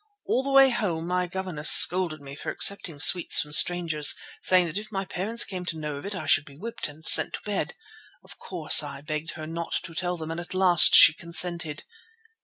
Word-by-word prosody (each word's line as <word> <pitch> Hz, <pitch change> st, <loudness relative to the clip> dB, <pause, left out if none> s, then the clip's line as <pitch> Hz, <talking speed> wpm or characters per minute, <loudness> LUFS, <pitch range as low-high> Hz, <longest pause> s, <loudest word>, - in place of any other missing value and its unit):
All 255 Hz, -, -2 dB
the 275 Hz, -, -8 dB
way 270 Hz, -1 st, +3 dB
home 180 Hz, -9 st, -5 dB
my 180 Hz, +1 st, -4 dB
governess 180 Hz, -4 st, -2 dB
scolded 175 Hz, -4 st, +5 dB
me 140 Hz, 0 st, -13 dB
for -, -, -9 dB
accepting 175 Hz, -6 st, -1 dB
sweets 175 Hz, +2 st, +4 dB
from 150 Hz, -, -6 dB
strangers, 160 Hz, -3 st, +4 dB, 0.3 s
saying 185 Hz, -1 st, +2 dB
that 170 Hz, +4 st, -5 dB
if 215 Hz, +1 st, -14 dB
my 195 Hz, -1 st, -6 dB
parents 210 Hz, +5 st, -4 dB
came 185 Hz, -2 st, -9 dB
to 165 Hz, -, -6 dB
know 150 Hz, -2 st, -8 dB
of 145 Hz, -, -11 dB
it, 200 Hz, -, -7 dB
I 165 Hz, -4 st, -9 dB
should 145 Hz, -1 st, +1 dB
be 140 Hz, -2 st, -18 dB
whipped 230 Hz, +7 st, -8 dB
and 155 Hz, +2 st, -17 dB
sent -, -, +4 dB
to -, -, -10 dB
bed. -, -, -6 dB, 0.5 s
Of -, -, -16 dB
course, -, -, +3 dB
I 140 Hz, -, -10 dB
begged 155 Hz, +1 st, -8 dB
her 155 Hz, -2 st, -11 dB
not 165 Hz, +1 st, -8 dB
to 165 Hz, -, -12 dB
tell 180 Hz, +1 st, -6 dB
them, 160 Hz, -1 st, -9 dB
and 165 Hz, -, -8 dB
at 175 Hz, +2 st, -11 dB
last 185 Hz, -3 st, +3 dB
she -, -, +8 dB
consented. 170 Hz, -2 st, -2 dB
170 Hz, 215 wpm, -23 LUFS, 155-185 Hz, 0.5 s, she